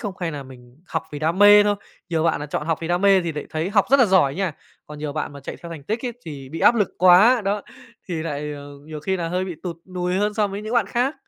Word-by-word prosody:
không? 205 -4 -5
Hay 165 -2 -2
là 145 -2 -6
mình 125 +1 -16
học 160 - -2
vì 145 - -5
đam 160 +5 -1
mê 205 0 +8
thôi? 205 0 +2 0.3
Nhiều 165 -2 0
bạn 165 - +1
là 150 - -4
chọn 150 +1 -4
học 165 -2 0
vì 165 - -4
đam 175 0 +1
mê 195 -1 +5
thì 170 -1 -3
lại 150 -1 -6
thấy 160 +5 -2
học 200 -2 +3
rất 275 - +6
là 245 - +6
giỏi 160 -8 +3
nha, 190 -2 -1 0.3
còn 150 0 -10
nhiều 150 -1 -4
bạn 155 -1 -4
mà 140 - -10
chạy - - -7
theo 170 - -8
thành 155 -4 -8
tích 225 - -3
ấy 240 - -3
thì 140 -4 -8
bị 165 +3 -7
áp - - +6
lực 210 -5 +1
quá, 190 +7 +6
đó, 200 +1 -1 0.5
thì 180 - -3
lại, 150 -2 -4
ờ, 145 0 -9 0.2
nhiều 155 -1 -8
khi 190 +5 -1
là 170 -2 -3
hơi 180 +2 -1
bị 180 -3 -5
tụt 170 -3 -5 0.2
nùi 180 0 -1
hơn 210 +2 0
so 210 -2 +2
với 200 +2 -6
những 220 +3 -4
bạn 235 -5 +3
khác. 250 +7 0
175 Hz, 300 wpm, -22 LUFS, 150-205 Hz, 0.5 s, mê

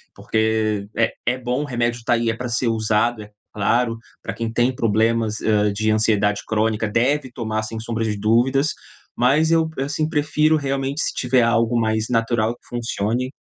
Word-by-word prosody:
porque 110 -2 0
é 115 - +2
é 125 +2 0
bom, 125 +3 -1
remédio 120 -3 -1
tá - - +3
aí, 115 -1 +1
é 115 - -1
pra 125 - -4
ser 120 +1 0
usado, 110 0 +1
é 105 - -15 0.2
claro, 115 +3 +1 0.2
pra - - -4
quem 115 -1 -4
tem 120 +2 +2
problemas, 110 0 +1
hã, 105 -2 +2
de 110 +2 0
ansiedade 105 -2 +2
crônica 110 0 0
deve 130 +4 0
tomar 110 -2 -2
sem 110 +1 -5
sombra 115 0 -3
de 105 -1 -1
dúvidas, 125 +7 +2 0.5
mas 145 +6 +3
eu, 165 -1 +3
assim, 145 +3 -1
prefiro 155 +1 +2
realmente 140 +1 -2
se - - -1
tiver 125 0 +2
algo 115 0 +2
mais 110 0 0
natural 115 -1 +1
que - - -27
funcione. 120 +1 -2
115 Hz, 175 wpm, -21 LUFS, 110-125 Hz, 0.5 s, tá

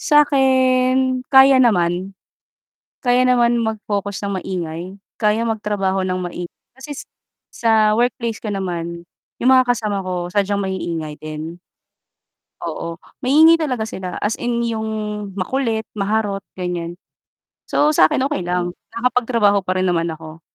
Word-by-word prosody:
Sakin 260 -3 +3
kaya 265 -1 +7
naman, 185 -4 +1 0.9
kaya 250 -1 +3
naman 240 -2 +3
mag-focus 205 -2 -3
ng 200 - -2
maingay, 170 -3 -4 0.3
kaya 220 +1 +1
magtrabaho 205 -4 -1
ng 185 0 -1
maingay, 175 -1 -7
kasi 275 +2 -8 0.5
sa 220 -2 +3
workplace 235 -1 -1
ko 215 - -4
naman 170 -3 -4 0.4
yung 250 - +5
mga 255 -1 +5
kasama 210 -4 -2
ko 180 -1 -4
sadyang 200 0 +1
maiingay 170 -5 -3
din, 155 +2 -7 1.1
oo, 165 0 -5 0.2
maingay 310 +5 +6
talaga 255 -8 -1
sila 185 -5 -6
as 210 - -1
in 235 -1 0
yung 220 -1 -2 0.5
makulit, 225 +2 -1
maharot 205 0 -1 0.2
ganyan. 175 -1 -4 0.7
So, 295 - +3
sa - - +6
akin 300 -4 0
okey 185 -11 -2
lang 175 0 -1 0.2
nakapagtrabaho 235 -4 +2
pa 185 0 -1
rin 185 - +1
naman 170 -1 +1
ako 160 0 -10
210 Hz, 130 wpm, -20 LUFS, 180-250 Hz, 1.1 s, kaya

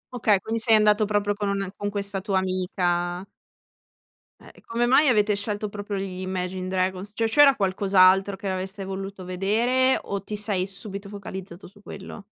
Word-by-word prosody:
Okay, 210 -4 +3
quindi 225 0 -2
sei 225 -1 +5
andato 210 0 +4
proprio 205 0 0
con 205 -1 -3
un' 200 0 -1
e 190 +1 -7
con 205 0 -3
questa 200 -1 -3
tua 195 -1 -1
amica. 180 -1 -1 1.1
Eh, - - -15
e - - -18
come 235 +1 0
mai 275 +4 +5
avete 210 -3 +3
scelto 205 0 -3
proprio 205 0 -6
gli 190 -1 -4
Imagine 185 0 -4
Dragons? 185 +2 -2
Cioè, 225 +1 0
c'era 275 +3 +6
qualcos'altro 195 0 +3
che 195 0 -5
avreste 190 +1 -4
voluto 195 0 -6
vedere? 230 +8 +1
O 200 0 -5
ti 210 - -5
sei 205 -3 -1
subito 195 +1 -5
focalizzato 190 -2 -8
su 205 +2 -19
quello? 200 0 -10
200 Hz, 175 wpm, -24 LUFS, 190-210 Hz, 1.1 s, c'era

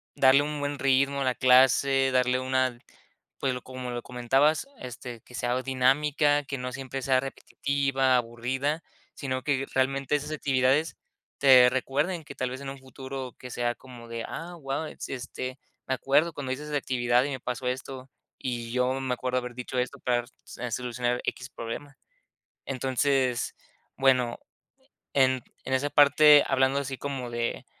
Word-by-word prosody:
darle 135 +1 +6
un 150 0 -3
buen 145 0 -2
ritmo 140 +1 +2
a - - +2
la 130 -1 +1
clase. 135 +1 +5
Darle 125 0 +2
una 130 -1 0 0.6
pues, 135 -2 0
lo 125 - -5
como 130 -1 -6
lo 120 0 -4
comentabas, 135 - +2
este, 125 -2 -8
que 125 - -14
sea 125 +2 0
dinámica, 145 +3 +2
que 140 -1 -5
no 125 0 -4
siempre 135 0 -5
sea 130 0 +3
repetitiva, 135 -1 0
aburrida, 130 +6 -2 0.3
sino 130 -2 -3
que 135 -2 0
realmente, 135 +1 +1
esas 150 +1 -3
actividades 140 +1 +1 0.4
te 130 -3 +8
recuerden, 145 +7 -1
que - - -10
tal 130 -1 -2
vez, 130 +2 -6
en 140 - -5
un 135 0 -8
futuro, 130 0 -7
que 125 - -9
sea 120 0 -1
como 120 -2 -13
de: 115 0 -4
"Ah, 175 +2 -6
guau. 135 +2 -3 0.2
Este, 130 +1 -6 0.3
me 130 - +1
acuerdo 145 +6 +2
cuando 135 -3 -4
hice 140 +3 -6
esa 150 0 -4
actividad, 125 -2 +2
y - - -2
me 130 - -4
pasó 125 0 -3
esto. 130 +1 -5 0.3
Y 120 -2 -4
yo 125 +1 +1
me 130 -1 -1
acuerdo, 125 +1 -1
haber 125 -1 -7
dicho 125 +1 -5
esto, 125 0 -3
para 120 -1 +1 0.4
r 120 -1 -4
solucionar 125 0 -1
x 130 +1 -3
problema". 140 +5 -7 0.7
Entonces, 130 -1 0 0.4
bueno, 125 -3 +3 0.8
en 130 -2 +3 0.2
en 130 - -1
esa 145 +2 0
parte, 145 +1 +7
hablando 135 +1 +2
así, 135 -1 -4
como 135 -4 -4
de 120 0 -3
130 Hz, 165 wpm, -27 LUFS, 125-140 Hz, 0.8 s, te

